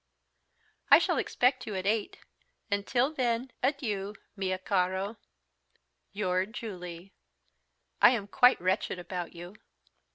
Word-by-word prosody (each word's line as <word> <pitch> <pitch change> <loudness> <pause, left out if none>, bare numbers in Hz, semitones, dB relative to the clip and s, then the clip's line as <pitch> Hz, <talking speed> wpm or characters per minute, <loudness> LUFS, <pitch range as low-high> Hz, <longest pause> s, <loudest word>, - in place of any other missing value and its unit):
I - - +10
shall - - +1
expect 255 +1 +1
you 210 - -4
at 185 0 -3
eight, 210 +1 0 0.5
until 240 +8 +1
when, 250 -2 -1
adieu, 215 -8 -1 0.2
mio 190 -2 -1
caro, 190 +3 -1 0.9
"Your 185 -2 0
JULIE. 185 -5 -8 0.9
"I - - +9
am 230 -5 0
quite 250 +5 +5
wretched 185 +1 0
about 175 0 -5
you." 175 +4 -10
200 Hz, 110 wpm, -29 LUFS, 185-235 Hz, 0.9 s, I